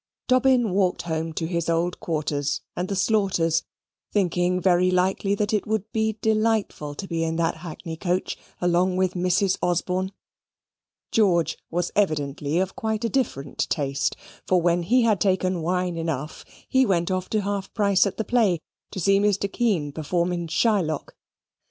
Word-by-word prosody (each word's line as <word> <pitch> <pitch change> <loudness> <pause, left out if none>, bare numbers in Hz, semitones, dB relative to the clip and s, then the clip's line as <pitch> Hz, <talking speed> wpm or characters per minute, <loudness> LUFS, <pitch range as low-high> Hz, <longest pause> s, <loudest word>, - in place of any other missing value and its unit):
Dobbin 255 -3 +3
walked 180 -2 +1
home 160 -1 -2
to 160 - -2
his 170 0 -2
old 170 +2 0
quarters 145 -3 -2
and 180 +1 -2
the 200 - -2
Slaughters', 190 -5 +2 0.5
thinking 180 -2 +1
very 180 0 +3
likely 190 +2 +1
that 205 +1 -1
it 210 - 0
would 220 0 -2
be 220 -1 0
delightful 215 -9 0
to 195 - -6
be 165 -2 -1
in 165 0 -1
that 165 0 0
hackney 160 0 -7
coach, 180 +1 -1 0.2
along 180 +1 +2
with 185 -1 +1
Mrs. 185 +1 +1
Osborne. 180 +2 0 1.0
George 180 -7 +3
was 175 +1 -1
evidently 150 -5 0
of 190 +1 0
quite 220 -2 -2
a - - +1
different 145 - -2
taste; 140 -2 -1 0.3
for 185 - +4
when 175 0 +2
he 240 +8 +3
had 215 -5 +2
taken 185 -2 +1
wine 180 +1 -1
enough, 155 -3 -4 0.2
he 260 0 +3
went 180 -6 +1
off 185 0 -2
to 215 - +1
half 200 -1 -3
price 200 -2 +3
at 195 - -5
the 220 - -2
play, 215 -6 +3 0.3
to 195 - -6
see 195 +3 +3
Mr. 200 -1 +1
Kean 195 -12 0
perform 170 +4 -1
in 170 -1 -3
Shylock. 165 -2 0
180 Hz, 165 wpm, -24 LUFS, 165-205 Hz, 1.0 s, for